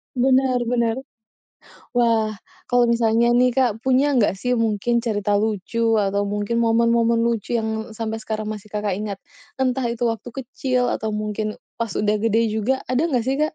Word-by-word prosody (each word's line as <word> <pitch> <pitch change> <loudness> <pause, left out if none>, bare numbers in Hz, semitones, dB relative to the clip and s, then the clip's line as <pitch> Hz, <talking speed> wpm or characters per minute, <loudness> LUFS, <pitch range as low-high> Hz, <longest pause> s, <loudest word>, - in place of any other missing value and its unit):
Benar, 255 0 +3
benar. 235 0 0 0.9
Wah, 225 -3 +2 0.3
kalau 245 -1 +3
misalnya 235 0 +3
nih, 245 0 +3
Kak, 245 -5 +2
punya 265 +3 +3
nggak 205 -4 +3
sih 220 +6 -3
mungkin 230 +1 +1
cerita 205 -3 0
lucu 220 +2 0
atau 200 -1 +1
mungkin 205 +3 -1
momen-momen 230 0 +3
lucu 235 0 -1
yang 220 -1 -2
sampai 225 0 -3
sekarang 215 -1 -4
masih 210 -1 -7
Kakak 205 -2 -1
ingat? 205 -2 -4 0.4
Entah 255 -1 0
itu 235 0 -4
waktu 225 +1 -6 0.2
kecil 255 0 -1
atau 215 0 -2
mungkin 215 0 -3 0.2
pas 230 -2 -3
udah 210 0 +1
gede 225 +1 +1
juga, 220 +5 -1
ada 255 +6 +2
nggak 255 -8 0
sih, 265 +3 -1
Kak? 305 +1 0
230 Hz, 165 wpm, -22 LUFS, 215-245 Hz, 0.9 s, Benar